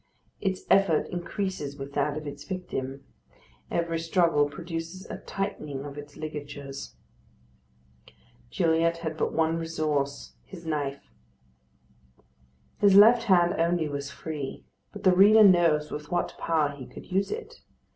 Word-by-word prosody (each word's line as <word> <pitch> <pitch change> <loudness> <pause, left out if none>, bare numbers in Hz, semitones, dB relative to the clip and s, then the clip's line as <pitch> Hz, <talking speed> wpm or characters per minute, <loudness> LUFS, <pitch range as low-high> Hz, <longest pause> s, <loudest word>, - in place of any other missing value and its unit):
Its 190 -2 -2
effort 195 -6 +4
increases 175 -5 -4
with 140 +1 -7
that 145 +1 0
of 155 - -6
its 145 0 -7
victim; 135 -6 -5 0.6
every 170 -1 -1
struggle 165 -3 +2
produces 165 +4 -6
a - - -6
tightening 150 -8 -4
of 140 -1 -8
its 145 0 -10
ligatures. 145 -2 -7 1.5
Gilliatt 165 -1 +2
had 160 0 -2
but - - -1
one 160 0 +1
resource, 155 -4 -2
his 175 -3 -12
knife. 145 -3 -3 1.7
His 200 -2 +5
left 230 +3 +7
hand 175 -4 +4
only 170 -1 +1
was 140 -1 -4
free; 145 -1 -6 0.3
but 205 -1 -10
the 185 -1 +5
reader 210 +3 +8
knows 170 -6 +4
with 150 0 -6
what 175 0 -1
power 155 -3 +1
he 140 -3 -10
could - - -12
use 195 +2 +1
it. 460 +2 -7
160 Hz, 135 wpm, -27 LUFS, 145-180 Hz, 1.7 s, reader